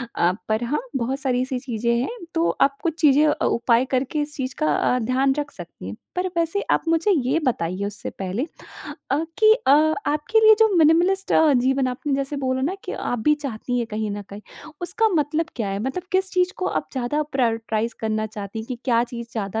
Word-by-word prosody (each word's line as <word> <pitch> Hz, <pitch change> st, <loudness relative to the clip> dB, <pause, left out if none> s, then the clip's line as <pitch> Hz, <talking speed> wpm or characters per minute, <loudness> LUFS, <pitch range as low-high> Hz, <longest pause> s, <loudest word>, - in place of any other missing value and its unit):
अ, 175 Hz, +1 st, +3 dB, 0.2 s
पर 220 Hz, +2 st, +1 dB
हाँ, 265 Hz, +6 st, -1 dB, 0.2 s
बहुत 265 Hz, +2 st, -1 dB
सारी 255 Hz, -3 st, 0 dB
ऐसी 255 Hz, 0 st, -2 dB
चीज़ें 235 Hz, -2 st, -1 dB
हैं, 455 Hz, -, -3 dB, 0.2 s
तो 330 Hz, +1 st, +2 dB
आप 275 Hz, 0 st, +3 dB
कुछ 330 Hz, -2 st, -2 dB
चीज़ें 295 Hz, 0 st, +5 dB
अ, -, -, 0 dB
उपाय 235 Hz, +1 st, +2 dB
करके 275 Hz, +4 st, -1 dB
इस 295 Hz, 0 st, -4 dB
चीज़ 255 Hz, -2 st, -4 dB
का 310 Hz, -, +2 dB
अ, 250 Hz, -, +1 dB
ध्यान 260 Hz, +4 st, +1 dB
रख 290 Hz, -1 st, -4 dB
सकती 175 Hz, -, -10 dB
हैं। 100 Hz, -, -6 dB, 0.2 s
पर 365 Hz, +1 st, 0 dB
वैसे 335 Hz, +5 st, +2 dB
आप -, -, +3 dB
मुझे 330 Hz, +5 st, +2 dB
ये 285 Hz, -3 st, +1 dB
बताइए 185 Hz, -5 st, -1 dB
उससे 205 Hz, 0 st, -5 dB
पहले 195 Hz, +6 st, -2 dB, 0.7 s
अ, 295 Hz, +4 st, +1 dB
कि 435 Hz, 0 st, +7 dB
अ, -, -, +5 dB, 0.4 s
आपके 305 Hz, +10 st, +2 dB
लिए 435 Hz, 0 st, +9 dB
जो 445 Hz, -1 st, +6 dB
मिनिमलिस्ट 345 Hz, +5 st, +3 dB
अ, 310 Hz, -2 st, +5 dB
जीवन 265 Hz, +1 st, +2 dB
आपने 265 Hz, +3 st, -3 dB
जैसे 275 Hz, +1 st, -2 dB
बोला 260 Hz, -1 st, -1 dB
ना 345 Hz, +7 st, 0 dB
कि -, -, -5 dB
आप 245 Hz, -, -3 dB
भी 300 Hz, -, +5 dB
चाहती 245 Hz, -3 st, -4 dB
हैं 235 Hz, -, -1 dB
कहीं 215 Hz, -1 st, -3 dB
न 205 Hz, 0 st, -4 dB
कहीं, 200 Hz, +1 st, -11 dB, 0.4 s
उसका 410 Hz, +6 st, +1 dB
मतलब 315 Hz, -3 st, 0 dB
क्या 215 Hz, -4 st, -2 dB
है? 195 Hz, -, -2 dB
मतलब 265 Hz, +9 st, -3 dB
किस 375 Hz, 0 st, +1 dB
चीज़ 365 Hz, +1 st, +2 dB
को 370 Hz, -, -2 dB
आप 305 Hz, -, -2 dB
ज़्यादा 265 Hz, +3 st, -1 dB
प्रायॉरिटाइज़ 225 Hz, -3 st, 0 dB
करना 220 Hz, -1 st, -1 dB
चाहती 210 Hz, 0 st, -7 dB
हैं 220 Hz, -, -6 dB
कि 250 Hz, -, -4 dB
क्या 235 Hz, -2 st, +3 dB
चीज़ 235 Hz, -1 st, -8 dB
ज़्यादा 220 Hz, -1 st, -3 dB
260 Hz, 215 wpm, -23 LUFS, 230-310 Hz, 0.7 s, लिए